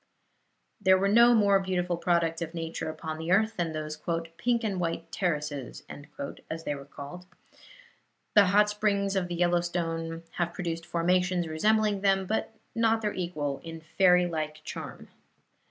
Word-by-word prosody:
There 190 0 +5
were 195 +1 +1
no 235 +4 +6
more 200 -3 +5
beautiful 180 -2 -1
products 170 -1 +1
of 165 0 -4
nature 165 -1 -4
upon 155 0 -5
the 165 +2 -3
earth 220 +4 +3
than 170 -2 -1
those 155 -1 -5 0.4
"pink 240 -1 +1
and 200 -4 -1
white 165 -1 -3
terraces," 150 -7 -3 0.7
as 165 0 -5
they 145 - -1
were 140 -1 -8
called. 145 +6 -10 1.1
The 205 -1 +7
hot 205 +3 +5
springs 200 -1 0
of 185 -2 0
the 175 - -4
Yellowstone 170 -1 -1
have 175 -1 -1
produced 165 -2 -4
formations 180 +1 +1
resembling 210 +5 +2
them, 195 -1 +2
but 220 +3 -1 0.2
not 225 -1 +2
their 210 - 0
equal 155 -6 -3
in 165 0 -7 0.2
fairy 180 -2 +6
like 155 -2 -4
charm. - - -8
175 Hz, 155 wpm, -28 LUFS, 165-195 Hz, 1.1 s, The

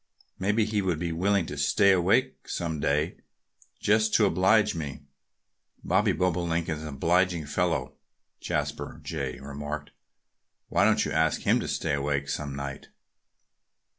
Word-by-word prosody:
Maybe 105 +3 +2
he 105 -1 0
would 90 -4 0
be 85 +1 -2
willing 95 +2 +1
to 75 -2 -6
stay 100 +8 +4
awake 100 +9 +1
some 80 -3 -3
day, 75 +4 0 0.6
just 110 +1 +2
to 110 - +5
oblige 105 +3 +3
me." 75 -5 -5 0.8
"Bobby 100 +4 +2
Bobolink 85 -2 0
is 80 -1 -3
an 80 - -6
obliging 85 +3 +1
fellow," 85 -3 -1 0.5
Jasper - - -3
Jay 70 -5 -4
remarked. 75 +2 -6 0.8
"Why - - +3
don't - - +3
you - - -3
ask 80 +1 +1
him - - +3
to - - -4
stay - - -1
awake 70 0 -1
some 70 -2 -3
night?" 70 0 -6
85 Hz, 140 wpm, -27 LUFS, 75-95 Hz, 0.8 s, to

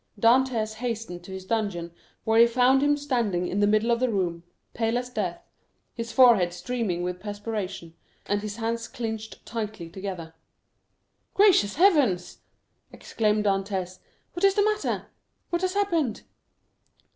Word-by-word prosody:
Dantès 230 -1 +3
hastened 225 -7 -4
to 190 - -10
his 190 0 -7
dungeon, 195 -6 -2 0.3
where 225 0 +3
he 235 - +8
found 250 +3 +3
him 290 0 +3
standing 235 -11 -1
in 195 - -2
the 205 - +4
middle 215 +3 +2
of 235 - +2
the 255 0 +1
room, 175 -5 -1 0.3
pale 225 +1 0
as 250 0 -4
death, 185 -7 -3 0.5
his 230 -1 -5
forehead 225 -9 +5
streaming 185 -2 -2
with 180 0 -3
perspiration, 205 -4 -5 0.3
and 205 0 0
his 210 -1 -5
hands 230 +1 -3
clenched 220 -2 -6
tightly 215 -7 -5
together. 185 -3 -6 1.0
"Gracious 380 - +4
heavens!" 280 - +3 0.5
exclaimed 215 -1 -1
Dantès, 195 -2 -1 0.3
"what 345 - -5
is 390 0 +5
the 410 - +4
matter? 425 0 -1 0.5
what 345 0 0
has 370 +1 -1
happened?" 335 - 0
220 Hz, 145 wpm, -26 LUFS, 190-250 Hz, 1.0 s, he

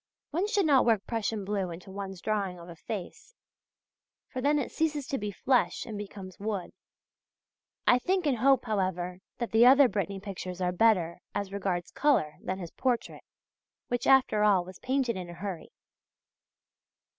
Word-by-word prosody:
One 350 +7 0
should 415 -4 +2
not 280 -4 +5
work 225 -4 +2
Prussian 220 -3 -2
blue 195 -2 -1
into 175 +3 -9
one's 195 -2 -6
drawing 200 -4 -1
of 170 0 -11
a 170 - -9
face; 210 - -7 0.9
for 255 - -4
then 290 +3 +3
it 285 - -2
ceases 300 -3 -1
to 275 - -1
be 210 0 -3
flesh 250 +5 +1
and 220 - -6
becomes 200 -2 -8
wood. 205 -3 -3 1.1
I 250 - +5
think 370 +5 0
and 265 -6 +1
hope, 265 0 +4
however, 185 -4 -1 0.2
that 235 - -3
the 230 +2 +6
other 270 +1 +8
Brittany 200 -3 -2
pictures 185 -2 -6
are 180 -1 +1
better, 180 -4 +2 0.2
as 200 -1 -3
regards 185 -3 -2
colour, 205 - +2
than 190 +1 -3
this 175 -3 -7
portrait, 250 -3 -1 0.7
which 245 0 -1
after 260 -6 +5
all 195 -4 +4
was 185 0 -11
painted 255 -4 0
in 180 -2 -6
a - - -7
hurry. 180 -1 -6
205 Hz, 170 wpm, -29 LUFS, 185-255 Hz, 1.1 s, other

